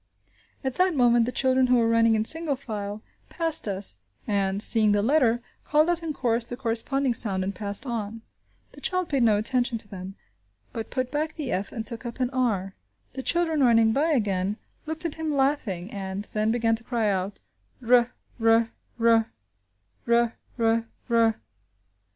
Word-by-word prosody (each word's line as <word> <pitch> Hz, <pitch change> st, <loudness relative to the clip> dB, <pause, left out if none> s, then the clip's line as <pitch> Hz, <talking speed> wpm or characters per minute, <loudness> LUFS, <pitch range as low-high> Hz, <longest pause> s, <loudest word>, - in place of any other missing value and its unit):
At 265 Hz, -1 st, -2 dB
that 365 Hz, -2 st, +2 dB
moment 240 Hz, -3 st, +4 dB
the -, -, -1 dB
children, 260 Hz, 0 st, +2 dB
who 250 Hz, -, +4 dB
were 230 Hz, -1 st, +2 dB
running 230 Hz, 0 st, +3 dB
in 215 Hz, 0 st, 0 dB
single 320 Hz, +1 st, +4 dB
file, 215 Hz, -5 st, -6 dB, 0.3 s
passed 330 Hz, -8 st, +1 dB
us, 195 Hz, -, -2 dB, 0.3 s
and, 195 Hz, -1 st, 0 dB
seeing 215 Hz, -1 st, +6 dB
the 205 Hz, 0 st, +1 dB
letter, 240 Hz, -2 st, +2 dB, 0.2 s
called 305 Hz, +3 st, +3 dB
out 345 Hz, -1 st, -1 dB
in 325 Hz, -2 st, -3 dB
chorus 240 Hz, -5 st, 0 dB
the 240 Hz, +1 st, -7 dB
corresponding 260 Hz, +2 st, -1 dB
sound 195 Hz, -5 st, -2 dB
and 195 Hz, +1 st, -3 dB
passed 205 Hz, +5 st, -2 dB
on. 225 Hz, -2 st, -4 dB, 0.5 s
The -, -, -15 dB
child 365 Hz, -2 st, 0 dB
paid 275 Hz, -3 st, +1 dB
no 220 Hz, -3 st, +4 dB
attention 240 Hz, +2 st, 0 dB
to 220 Hz, -, -3 dB
them, 190 Hz, -1 st, -8 dB, 0.6 s
but 225 Hz, -1 st, -5 dB
put 255 Hz, -1 st, -3 dB
back 305 Hz, +1 st, -2 dB
the 290 Hz, -5 st, -4 dB
f 195 Hz, +2 st, -2 dB
and 225 Hz, -3 st, -5 dB
took 235 Hz, 0 st, -6 dB
up 240 Hz, +1 st, -7 dB
an 250 Hz, -1 st, 0 dB
r. 215 Hz, -7 st, -1 dB, 0.4 s
The 265 Hz, -, -5 dB
children 325 Hz, 0 st, 0 dB
running 225 Hz, -2 st, +4 dB
by 290 Hz, +6 st, +1 dB
again, 205 Hz, -, 0 dB, 0.3 s
looked 315 Hz, +1 st, -5 dB
at 330 Hz, -, -2 dB
him 320 Hz, -1 st, -2 dB
laughing, 255 Hz, -10 st, -1 dB
and 195 Hz, 0 st, -5 dB
then 215 Hz, 0 st, 0 dB
began 230 Hz, 0 st, +1 dB
to 225 Hz, -, -5 dB
cry 230 Hz, -3 st, -1 dB
out 195 Hz, 0 st, -2 dB, 0.5 s
"r, 245 Hz, 0 st, +4 dB, 0.3 s
r, 225 Hz, 0 st, +4 dB, 0.3 s
r! 225 Hz, -, -1 dB
230 Hz, 170 wpm, -25 LUFS, 210-265 Hz, 0.6 s, seeing